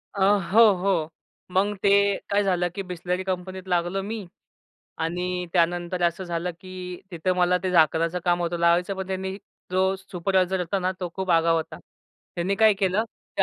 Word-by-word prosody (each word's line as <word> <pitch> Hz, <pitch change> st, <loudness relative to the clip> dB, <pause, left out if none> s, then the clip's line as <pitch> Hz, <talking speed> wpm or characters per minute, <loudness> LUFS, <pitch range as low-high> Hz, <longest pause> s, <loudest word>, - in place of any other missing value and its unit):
अ, -, -, -4 dB
हो, 195 Hz, +1 st, +3 dB, 0.2 s
हो. 180 Hz, -4 st, 0 dB, 0.4 s
मग 200 Hz, +3 st, +1 dB
ते 200 Hz, -, +4 dB, 0.4 s
काय 205 Hz, +1 st, +2 dB
झालं 180 Hz, -2 st, +1 dB
की 200 Hz, -, -3 dB
बिसलेरी 180 Hz, +1 st, -3 dB
कंपनीत 185 Hz, 0 st, -4 dB
लागलो 175 Hz, +2 st, 0 dB
मी 215 Hz, 0 st, -5 dB, 0.8 s
आणि 180 Hz, +2 st, -2 dB
त्यानंतर 175 Hz, 0 st, +1 dB
असं 170 Hz, +2 st, 0 dB
झालं, 175 Hz, 0 st, -2 dB
की 185 Hz, -1 st, -7 dB
तिथं 180 Hz, +1 st, -1 dB
मला 180 Hz, 0 st, +3 dB
ते 185 Hz, -, -1 dB
झाकणाचं 165 Hz, 0 st, +3 dB
काम 175 Hz, -1 st, +2 dB
होतं 175 Hz, 0 st, -1 dB
लावायचं 170 Hz, +3 st, +2 dB
पण 190 Hz, 0 st, -4 dB
त्यांनी 190 Hz, 0 st, -3 dB, 0.3 s
जो 190 Hz, +1 st, +2 dB
सुपरवायझर 190 Hz, 0 st, 0 dB
होता 180 Hz, +3 st, -1 dB
ना, 185 Hz, 0 st, 0 dB
तो 180 Hz, -, -2 dB
खूप 190 Hz, -1 st, -3 dB
आगाऊ 165 Hz, 0 st, +4 dB
होता. 160 Hz, -, -4 dB, 0.6 s
त्यांनी 180 Hz, +3 st, 0 dB
काय 220 Hz, +1 st, +5 dB
केलं, 195 Hz, +2 st, +1 dB, 0.3 s
ते -, -, +6 dB
180 Hz, 170 wpm, -25 LUFS, 175-190 Hz, 0.8 s, ते